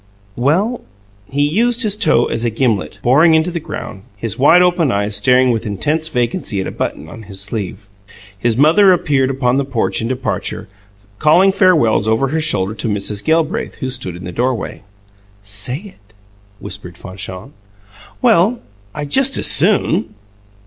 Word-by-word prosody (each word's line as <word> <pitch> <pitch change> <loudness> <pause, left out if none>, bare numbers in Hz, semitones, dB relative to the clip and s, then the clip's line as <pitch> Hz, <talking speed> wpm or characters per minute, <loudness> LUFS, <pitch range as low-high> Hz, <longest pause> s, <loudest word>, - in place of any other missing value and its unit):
"Well 185 - 0 0.2
" 100 0 -33
He 145 +4 0
used 235 - +1
his 210 -2 0
toe 160 - +2
as 115 - -3
a 120 - +1
gimlet, 115 -4 -1
boring 155 +7 +4
into 160 +3 +1
the 170 - -3
ground, 105 -9 -8 0.2
his 110 0 -4
wide 165 +6 +6
open 175 -6 +1
eyes 105 0 -1
staring 125 +5 +3
with 115 -1 -2
intense 150 +11 -1
vacancy 120 - -2
at 95 - -2
a - - -5
button 80 - -5
on 110 - -11
his 95 -1 -5
sleeve. 100 0 -5 0.5
His 115 +3 -1
mother 170 +8 +5
appeared 140 -6 +1
upon 130 -1 0
the 140 - +1
porch 130 -5 -2
in 115 - -2
departure, 130 0 -4 0.5
calling 175 +6 +4
farewells 160 - +2
over 115 +5 +1
her 160 +3 -1
shoulder 105 -10 -1
to 115 - -5
Mrs. 105 -1 -1
Gelbraith, 160 -1 0
who 130 -3 -5
stood 120 -9 -4
in 90 - -10
the 90 - -6
doorway. 125 0 -3 0.6
"Say 105 +6 0 0.2
it!" 105 +2 -30 0.5
whispered 90 -3 -7
Fanchon. 95 +6 -9 0.7
"Well, 225 0 +3 0.4
I 150 -1 -4
just 270 - +3
as - - 0
SOON." 185 - +3
130 Hz, 165 wpm, -16 LUFS, 105-160 Hz, 0.7 s, wide